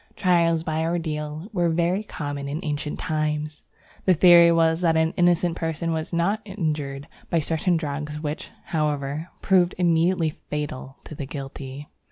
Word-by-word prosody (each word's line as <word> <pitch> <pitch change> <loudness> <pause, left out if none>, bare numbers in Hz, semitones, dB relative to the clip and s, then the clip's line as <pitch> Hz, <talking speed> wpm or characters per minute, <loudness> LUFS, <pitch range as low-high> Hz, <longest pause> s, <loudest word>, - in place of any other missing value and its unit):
Trials 170 -3 +2
by 160 0 -1
ordeal 155 -1 -3
were 175 -3 +2
very 170 +4 +1
common 145 -8 -5
in 150 +3 -3
ancient 150 0 -3
times. 150 -1 -2 0.4
The 185 - +5
theory 170 0 +8
was 165 0 +3
that 165 -2 +3
an 160 +1 +2
innocent 175 -1 +3
person 165 0 -2
was 160 -1 -3
not 190 +5 +1
injured 150 -8 -3 0.2
by 170 - +2
certain 165 +3 +1
drugs, 150 -1 -4
which, 150 0 -4 0.2
however, 150 0 -2
proved 185 -2 +3
immediately 170 -1 +2
fatal 145 -3 -6
to - - -10
the 140 -2 -6
guilty. 140 0 -7
160 Hz, 150 wpm, -24 LUFS, 150-170 Hz, 0.4 s, theory